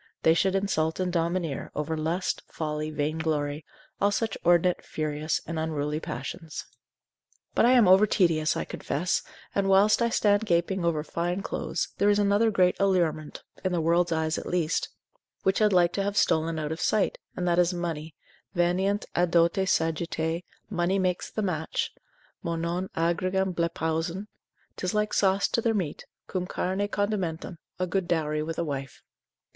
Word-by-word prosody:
they 160 - +6
should 190 +3 +2
insult 165 -5 0
and 180 -1 -1
domineer 170 -3 -1
over 150 +2 -2
lust, 165 +4 -1
folly, 155 -1 -3
vainglory, 150 -1 -1 0.4
all 200 - +4
such 220 +1 -1
inordinate, 175 +1 +3
furious 155 0 -2
and 165 0 -3
unruly 150 -1 -1
passions. 155 +1 -6 0.9
But - - +4
I 250 - +6
am 240 -6 +6
over 190 +3 +7
tedious, 165 -6 +2
I - - -2
confess, 170 +5 -1 0.3
and 195 -1 +1
whilst 200 +4 +5
I 235 - +3
stand 210 -1 +2
gaping 175 +1 +1
after 160 -3 +1
fine 175 +4 -2
clothes, - - -2
there 205 - +4
is 205 - +4
another 205 +2 +3
great 185 -4 +3
allurement, 175 -6 0 0.2
(in 185 -1 0
the 175 - +1
world's 170 +2 +2
eye 160 -1 +1
at 155 0 -2
least) 175 -3 0 0.5
which 190 0 +2
had 210 -1 +4
like 175 -2 +4
to 200 - 0
have 200 +1 -2
stolen 160 +1 +2
out 155 -1 -3
of 160 - -4
sight, 215 -2 +1 0.2
and 180 - -2
that 175 0 +3
is 175 0 +4
money, 165 -4 -4 0.4
veniunt 185 +4 +1
a 175 +1 +2
dote 170 +3 +3
sagittae, 160 0 0 0.3
money 185 -1 0
makes 185 -2 0
the 215 - -3
match; 160 -5 -1 0.5
Μονὸν 170 +2 -2
ἄργυρον 185 +3 +1
βλέπουσιν: 170 +2 -1 0.5
'tis 185 +3 -2
like 210 0 +1
sauce 195 0 +3
to 230 - +1
their 225 -1 +1
meat, 175 -8 -3 0.2
cum 180 -1 -3
carne 190 +3 -1
condimentum, 190 -5 -2 0.2
a 185 - 0
good 180 0 -1
dowry 155 -3 0
with 160 +1 -4
a - - 0
wife. 135 -4 -5
175 Hz, 165 wpm, -27 LUFS, 160-190 Hz, 0.9 s, over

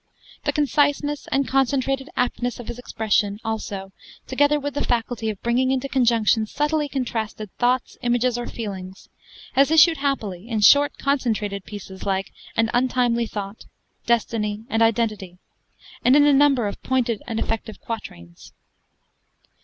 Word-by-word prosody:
The - - +2
conciseness 290 0 +1
and 270 -1 +1
concentrated 270 +1 0
aptness 245 0 -1
of 240 - -8
his 240 - -6
expression 210 -4 0
also 200 -3 -4 0.3
together 290 +3 +2
with 285 0 -4
a - - 0
faculty 230 -1 -1
of 210 -3 -5
bringing 245 +2 +2
into 265 +1 0
conjunction 235 -4 +2
subtly 295 +3 0
contrasted 225 -6 -3
thoughts, 250 +1 0
images, 245 0 +1
or 240 0 -4
feelings 195 -4 -7 0.4
has 275 +1 +4
issued 320 +1 +6
happily 225 -8 -3
in 220 -3 -1
short, 285 +7 +6
concentrated 220 -8 -1
pieces 195 -2 -9
like 195 -1 -1 0.3
'An 225 -1 +2
Untimely 245 -1 +1
Thought,' 200 0 -7 0.4
'Destiny,' 220 -2 0
and 225 - +1
'Identity,' 215 -5 0 0.7
and 250 +3 +5
in 290 0 +6
a 290 - +5
number 275 -4 +4
of 200 - -6
pointed 245 -4 0
and 225 -2 -2
effective 225 -1 -3
quatrains. 85 - -8
235 Hz, 140 wpm, -23 LUFS, 215-270 Hz, 0.7 s, issued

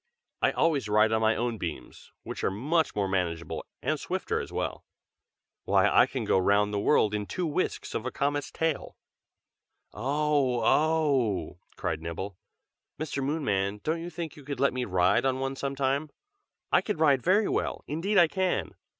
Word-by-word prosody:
"I - - +4
always 145 -10 +1
ride 105 +1 +4
on 110 0 +2
my 110 0 +3
own 120 -2 -2
beams, 85 - -7
which - - -6
are - - +3
much 150 - 0
more 100 -2 0
manageable, 85 -3 -2 0.2
and - - 0
swifter - - -2
as - - -6
well. - - -3 0.8
Why, - - +4
I - - +5
can - - -4
go - - +3
round 100 +2 +2
the 100 - 0
world 105 -2 +3
in 105 -1 -2
two 180 - -2
whisks 160 +3 -2
of 110 - -2
a 130 - -2
comet's 145 +2 -1
tail." 160 -3 -2 1.0
"Oh! 140 -3 +1
oh!" 140 - +2 0.2
cried - - -3
Nibble. 85 +4 -5 0.6
"Mr. 150 -3 -3
Moonman, 105 -9 -1
don't 165 +2 -1
you 170 - -5
think 165 -2 -6
you 145 - -13
could 140 -1 -5
let 140 0 +3
me 125 -1 -2
ride 95 +3 +2
on 130 -1 +1
one 135 0 -2
some 140 0 -3
time? 140 +3 0 0.6
I - - +5
can 210 - -3
ride 145 -4 +4
very 200 - +3
well, - - -2
indeed 180 +8 -1
I 175 -2 +7
can! 180 - -1
135 Hz, 175 wpm, -28 LUFS, 105-155 Hz, 1.0 s, I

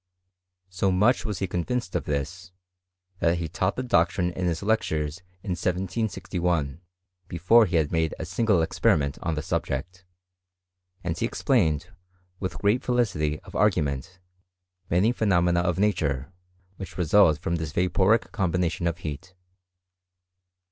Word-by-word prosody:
So 95 +1 +1
much 105 +9 +3
was 105 -4 -3
he 95 - -2
conyinced 90 +4 -2
of - - -2
this, 85 +5 -4 0.7
that 85 +1 +2
he 85 -1 -3
taught 95 +5 -1
the 130 - -3
doctrine 90 -5 +2
in 90 0 -2
his 85 +2 -2
lectures 80 -8 0 0.3
in 95 - -4
1761, 90 - -2 0.5
before 105 +7 +4
he 85 - -2
had 80 -3 +2
made 80 -1 0
a 80 - -5
single 90 0 +2
experiment 70 -3 +1
on 85 -3 -1
the 75 - -3
subject; 90 +7 -3 1.0
and 85 -2 -2
he - - -1
explained, 80 +5 +1 0.5
with 95 - -4
great 105 +5 +1
felicity 95 -12 0
of - - -14
ar 105 +2 +5
gument, 80 0 -3 0.7
many 95 +7 +3
phenomena 90 -7 +2
of 90 0 0
nature, 85 -8 0 0.4
which 95 -2 -8
result 90 -2 +4
from 85 +2 -2
this 80 -2 -4
vaporific 95 +6 +2
combination 90 -2 0
of 85 -1 -1
heat. 85 +2 -7
90 Hz, 140 wpm, -26 LUFS, 80-95 Hz, 1.0 s, ar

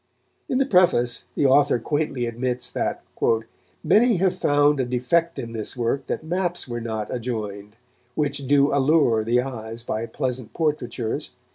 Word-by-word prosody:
In 255 - +1
the 270 - +3
preface 175 - +3
the 145 - +1
author 140 -1 +5
quaintly 140 0 -1
admits 120 +1 -2
that - - -2 0.8
"many 215 +8 +4
have 185 0 +2
found 145 0 +3
a 130 - +1
defect 125 +8 0
in 115 - -5
this 110 +1 -5
work 125 +3 -1
that - - -3
maps 175 0 -2
were 120 -1 -4
not 110 -2 -4
adjoined, 105 -4 -5 0.4
which 140 -2 -2
do 140 +1 +4
allure 140 -5 +3
the 120 +3 +2
eyes 115 -3 -7
by 115 -1 -3
pleasant 130 -3 -4
portraitures 140 -4 -2
130 Hz, 150 wpm, -23 LUFS, 115-150 Hz, 0.8 s, author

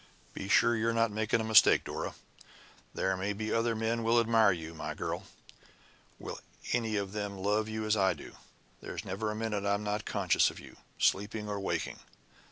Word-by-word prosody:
Be 95 - -6
sure 120 +4 +5
you're 115 +1 +1
not 115 -1 +2
making 110 +2 0
a - - -2
mistake, 110 0 +6
Dora! - - -5 0.8
There 95 0 0
may 95 +2 -2
be 110 +1 -3
other 115 0 +1
men 115 +1 -1
will 115 +1 +3
admire 115 -2 +4
you, 80 -2 -5
my 80 - -5
girl - - -4 0.9
will - - -7 0.3
any 115 -3 0
of 100 -2 -2
them 105 -1 -4
love 105 +3 0
you 110 0 -3
as 110 0 +2
I 95 -2 +2
do? - - -11 0.5
There's - - -6
never 100 +3 -3
a 105 - -3
minute 110 -2 -2
I'm 100 +1 0
not 105 0 -2
conscious - - +2
of - - -10
you, - - -13 0.2
sleeping 105 +2 +1
or 100 -1 -3
waking. 95 - -2
105 Hz, 185 wpm, -31 LUFS, 100-110 Hz, 0.9 s, mistake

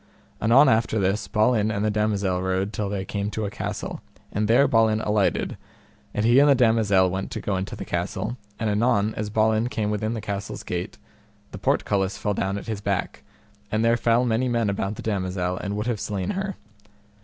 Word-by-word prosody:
Anon 125 +6 +6
after 110 -2 +2
this 95 +1 0
Balin 110 0 +2
and 105 -1 -1
the 105 - +2
damosel 100 -3 0
rode 95 +2 -1
till 105 -2 -2
they 100 -1 -3
came 100 +1 -3
to 110 0 -3
a 100 - -4
castle, - - -5 0.3
and 105 +1 0
there 120 +5 +5
Balin 110 -1 +3
alighted, 105 -2 0 0.5
and 105 - -1
he 120 +3 +6
and 145 +1 +6
the 140 - +6
damosel 110 -6 +3
went 95 +1 -3
to - - -4
go 100 - -2
into 95 +1 -3
the - - -7
castle, 120 - -3 0.2
and 110 - -1
anon 105 0 +2
as 105 0 -4
Balin 110 +1 +2
came 105 -3 -1
within 110 +2 -1
the - - -3
castle's 100 -1 -5
gate 90 0 -4 0.5
the - - -8
portcullis 95 -1 0
fell 105 - -1
down 95 0 -1
at - - -7
his 110 -3 -4
back, 100 -2 -2 0.5
and 110 +1 +1
there 115 0 +4
fell 120 +1 +2
many 120 +2 +1
men 115 -4 +1
about 100 +1 -2
the - - -8
damosel, 90 -3 -1
and 100 +1 -4
would 105 - -2
have 120 -4 -1
slain 95 -3 -2
her. 195 0 -3
105 Hz, 200 wpm, -24 LUFS, 100-115 Hz, 0.5 s, Anon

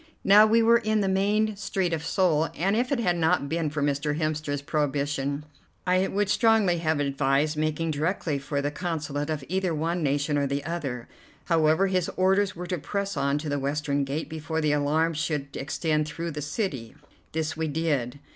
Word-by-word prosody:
Now 210 +2 +7
we 225 +1 +4
were 235 +1 +5
in 215 -1 +1
the 195 - +1
main 205 +3 +1
street 190 -4 -1
of 160 -1 -2
Seoul, 165 -4 +2
and 195 +4 +1
if 245 +4 0
it 275 - +1
had 180 -6 +1
not 160 -3 +2
been 160 0 -1
for 150 -1 -2
Mr. 145 +1 0
Hemster's 155 -3 -2
prohibition 145 -1 -1 0.4
I 185 +1 +2
would 205 +1 0
strongly 210 -5 +3
have 160 -2 0
advised 140 +2 +1
making 155 +1 -1
directly 155 -1 -1
for 140 +1 -3
the 145 - -1
Consulate 150 -3 -3
of 155 -3 -2
either 185 -1 -1
one 165 +3 -1
nation 145 0 +1
or 140 - +1
the 140 +1 -2
other. 140 -8 -4 0.4
However, 160 +2 +3
his 185 -3 0
orders 190 +1 +2
were 180 +2 -6
to 180 -1 -3
press 200 +5 -3
on 140 +1 +1
to 150 +1 -5
the 145 -1 -1
western 140 +1 -1
gate 140 +4 -3
before 160 0 -4
the 155 -2 +1
alarm 150 +3 +1
should 150 -3 -3
extend 155 +2 -1
through 165 +2 -4
the 150 -1 -5
city. 145 - -3 0.4
This 155 -1 -2
we 160 0 -2
did. 145 -5 -1
155 Hz, 190 wpm, -26 LUFS, 145-185 Hz, 0.4 s, Now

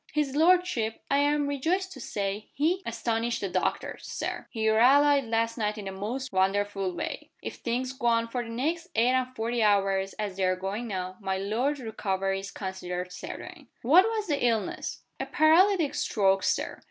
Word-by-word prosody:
"His 290 -2 0
lordship, 320 -9 +2
I 280 - +4
am 290 0 +2
rejoiced 330 +7 -1
to 265 - -9
say, 205 -1 -3
has 325 +5 +3
astonished 230 0 -1
the 200 - -2
doctors, 185 0 -2
Sir. - - -4
He 220 -3 -1
rallied 275 +5 +5
last 230 +1 0
night 210 0 -1
in 210 - -6
the 195 - -4
most 225 +6 -4
wonderful 195 0 +1
way. - - -5
If - - -5
things 250 +2 -2
go 240 -2 -2
on 230 0 +3
for 245 +1 -3
the 230 - -7
next 320 +9 -2
eight 235 +2 +4
and 255 0 0
forty 230 +1 -1
hours 195 -2 +2
as 205 -3 -4
they 195 - 0
are 185 0 +2
going 195 +6 -4
now, 185 -2 -4
my 190 -1 -1
lord's 240 +9 -1
recovery 195 -4 -2
is 195 0 -7
considered 180 -2 -5
certain." 300 - -8 0.2
"What 330 - +7
was 445 -2 -1
the 290 -8 -1
illness?" 240 - -1 0.2
"A - - -3
paralytic 330 +1 +4
stroke, 195 -2 +2
Sir. - - -1
230 Hz, 180 wpm, -28 LUFS, 195-285 Hz, 0.2 s, What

